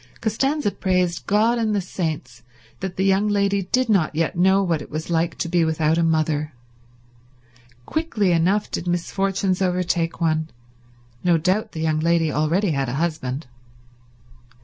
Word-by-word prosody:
Costanza 270 +3 0
praised 180 -3 -1
God 225 +4 +3
and 215 -2 0
the - - +2
saints 160 -10 -4 0.4
that 190 -1 -5
the 190 - +1
young 195 +2 +3
lady 200 -1 +1
did 250 +7 0
not 190 -8 +2
yet 165 0 0
know 190 +3 +4
what 165 -5 0
it - - -10
was 155 +2 -5
like 165 0 0
to - - -2
be 170 0 +2
without 160 0 +1
a - - +2
mother. 155 -2 0 1.3
Quickly 230 - 0
enough 180 +5 +1
did 175 - -4
misfortunes 190 +2 -1
overtake 180 -2 0
one; 160 -1 0 0.7
no 175 -2 +4
doubt 190 +6 0
the 160 - -5
young 155 -1 +1
lady 165 -1 +2
already 165 +6 +1
had 135 -3 -1
a 125 - -3
husband. 150 -3 -2
175 Hz, 155 wpm, -22 LUFS, 160-195 Hz, 1.3 s, know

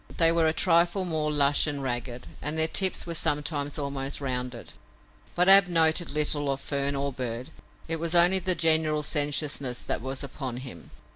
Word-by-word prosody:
They 165 -1 +4
were 165 -1 +1
a - - +2
trifle 170 +2 +2
more 155 -3 -2
lush 145 0 +3
and 145 -2 -3
ragged, 120 -1 -5 0.2
and 150 +3 -2
their 160 0 +3
tips 190 +3 +1
were 170 - -5
sometimes 145 -2 -2
almost 140 -1 -3
rounded. 125 -3 -5 0.6
But 180 +1 +2
Ab 195 -1 +8
noted 165 0 +2
little 145 -1 0
of 135 0 -2
fern 140 0 -2
or 140 0 -3
bird. 125 -1 -5 0.4
It 165 0 -1
was 170 +1 -2
only 175 +2 +5
the 185 0 -1
general 155 -2 +2
sensuousness 145 -4 -1
that - - -3
was 130 +2 -5
upon 130 -2 -6
him. 85 -11 -12
150 Hz, 180 wpm, -26 LUFS, 135-165 Hz, 0.6 s, Ab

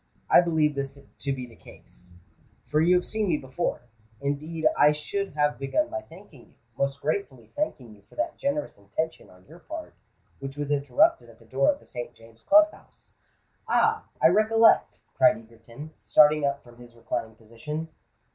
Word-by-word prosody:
I - - +8
believe 160 -3 +1
this 140 0 -4
to 140 0 -7
be 130 -2 -4
the 115 -2 -16
case—for 90 - -8
you 175 +3 +5
have 180 - +1
seen 215 -1 -2
me 165 -4 +2
before. 130 +5 -3 0.4
Indeed 155 +3 -3
I 150 0 +5
should 195 +6 -4
have 150 0 0
begun 300 - 0
by 335 +1 -4
thanking 170 - -16
you—most 135 +4 -5
gratefully 145 -6 -3
thanking 135 - -3
you 105 - -19
for - - -19
that 315 +1 -2
generous 280 - -3
intention 105 +12 -4
on 90 0 -20
your 165 +4 -15
part 320 - -8 0.5
which 135 +1 -7
was 145 0 -3
interrupted 295 - +2
at - - -17
the - - -20
door 295 - +2
of 285 - -6
the - - -21
St. 120 -1 -7
James's 115 0 -18
Club 310 +1 +6
House——" - - -19 0.5
"Ah! 440 -1 +2
I 160 - +6
recollect!" 220 +4 +4
cried 160 - +4
Egerton, 115 +6 -12
starting 150 +8 +5
up 140 0 -3
from 120 -1 -17
his 120 -1 -15
reclining 115 -1 -4
position. 115 +9 -7
150 Hz, 175 wpm, -26 LUFS, 120-180 Hz, 0.5 s, I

